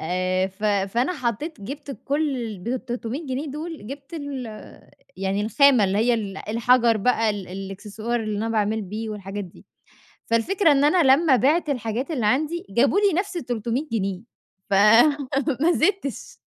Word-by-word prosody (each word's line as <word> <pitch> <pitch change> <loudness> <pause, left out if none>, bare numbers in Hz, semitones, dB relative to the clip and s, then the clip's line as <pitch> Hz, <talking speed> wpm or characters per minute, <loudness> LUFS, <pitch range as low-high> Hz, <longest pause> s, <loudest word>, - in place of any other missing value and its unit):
آآ 185 +2 0
ف 195 +3 -9
فأنا 210 - +1
حطّيت 255 - -3
جِبت 280 +7 -7
كل 285 0 0
ال 225 -5 -5
بال300 245 - -4
جنيه 265 +3 -3
دُول 305 -2 -7
جِبت 275 +5 -9
ال 285 -5 -5 0.7
يعني 195 +1 -1
الخامة 250 +1 +4
اللي 195 +1 0
هي 240 +2 +3
ال 200 -4 -4
الحجر 235 +1 +3
بقى، 225 0 +2
ال 200 -3 -5
الإكسسوار 205 +5 -4
اللي 215 -2 -3
أنا 225 +2 -2
باعمل 220 0 0
بيه 215 +3 -5
والحاجات 200 0 -5
دي، 175 - -16 0.6
فالفكرة 320 - +2
إن 280 0 +3
أنا 335 +4 +4
لمّا 305 -4 +3
بِعت 305 +7 +2
الحاجات 245 +2 -2
اللي 250 -9 -1
عندي، 310 +9 0
جابوا 270 - +3
لي 405 -2 +3
نفس 390 -2 -6
ال300 245 0 -3
جنيه، 195 -4 -1 0.5
فما 275 - +3
زِدتش. 355 - -1
235 Hz, 155 wpm, -23 LUFS, 210-285 Hz, 0.7 s, الخامة